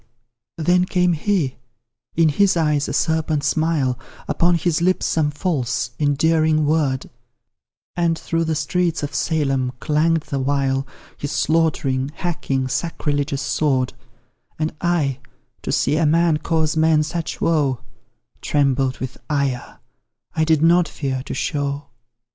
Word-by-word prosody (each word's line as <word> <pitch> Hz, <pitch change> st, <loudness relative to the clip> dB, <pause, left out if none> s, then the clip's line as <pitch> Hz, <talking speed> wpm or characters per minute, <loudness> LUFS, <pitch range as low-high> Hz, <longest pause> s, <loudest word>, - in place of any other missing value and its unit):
Then 180 Hz, +3 st, +3 dB
came 180 Hz, -1 st, +2 dB
he 165 Hz, -5 st, 0 dB, 0.6 s
in 165 Hz, -1 st, +4 dB
his 190 Hz, +4 st, +3 dB
eyes 150 Hz, -3 st, +1 dB
a -, -, -2 dB
serpent 160 Hz, -2 st, 0 dB
smile, 145 Hz, -4 st, +1 dB, 0.3 s
Upon 175 Hz, +1 st, +2 dB
his 170 Hz, 0 st, 0 dB
lips 185 Hz, +1 st, +2 dB
some 155 Hz, -2 st, +1 dB
false, 130 Hz, -7 st, -1 dB
endearing 155 Hz, +1 st, +2 dB
word, 145 Hz, -4 st, +1 dB, 0.9 s
And 170 Hz, -2 st, +1 dB
through 165 Hz, 0 st, -1 dB
the 160 Hz, 0 st, 0 dB
streets 165 Hz, +1 st, 0 dB
of 145 Hz, 0 st, -4 dB
Salem 135 Hz, -6 st, 0 dB
clang'd 160 Hz, +2 st, +2 dB
the 140 Hz, -, -3 dB
while 135 Hz, 0 st, 0 dB, 0.3 s
His 145 Hz, -, -4 dB
slaughtering, 140 Hz, -3 st, +1 dB
hacking, 135 Hz, -7 st, -2 dB
sacrilegious 145 Hz, -2 st, -1 dB
sword 130 Hz, -4 st, 0 dB, 0.6 s
And 155 Hz, 0 st, -2 dB
I, 155 Hz, -7 st, +1 dB, 0.4 s
to -, -, -3 dB
see 145 Hz, +4 st, +1 dB
a 160 Hz, -1 st, +3 dB
man 165 Hz, 0 st, +3 dB
cause 155 Hz, 0 st, 0 dB
men 160 Hz, -1 st, +4 dB
such 165 Hz, +1 st, -4 dB
woe, 145 Hz, -7 st, +1 dB, 0.6 s
Trembled 135 Hz, -2 st, +1 dB
with 130 Hz, 0 st, -6 dB
ire 140 Hz, -4 st, -1 dB, 0.6 s
I 160 Hz, -, +2 dB
did 160 Hz, -1 st, +3 dB
not 170 Hz, 0 st, +5 dB
fear 135 Hz, -3 st, -3 dB
to -, -, -4 dB
show. 140 Hz, 0 st, -2 dB
150 Hz, 130 wpm, -21 LUFS, 140-165 Hz, 0.9 s, not